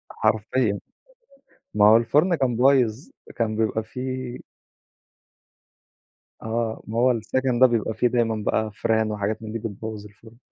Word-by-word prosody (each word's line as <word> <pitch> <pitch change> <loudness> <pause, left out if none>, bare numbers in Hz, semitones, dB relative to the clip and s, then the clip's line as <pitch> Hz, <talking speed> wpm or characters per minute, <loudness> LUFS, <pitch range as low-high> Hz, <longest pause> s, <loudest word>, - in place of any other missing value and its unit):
حرفيًا، 110 0 0 0.9
ما 105 -1 +4
هو 110 - +8
الفرن 150 +10 +2
كان 130 -6 0
بايظ 125 0 +2 0.3
كان 115 -2 -1
بيبقى 110 0 0
في 110 +3 -10 2.4
آه، 115 0 -3
ما 110 - -4
هو 125 +1 +4
السكن 125 +2 -1
ده 130 - +8
بيبقى 115 -2 -1
في 120 +3 +1
دايمًا 115 -3 0
بقى 110 -1 0
فيران، 110 0 0
وحاجات 105 +1 -3
من 110 - -6
دي 115 - -4
بتبوّظ 110 0 -6
الفرن. 110 +2 -16
110 Hz, 135 wpm, -24 LUFS, 110-120 Hz, 2.4 s, هو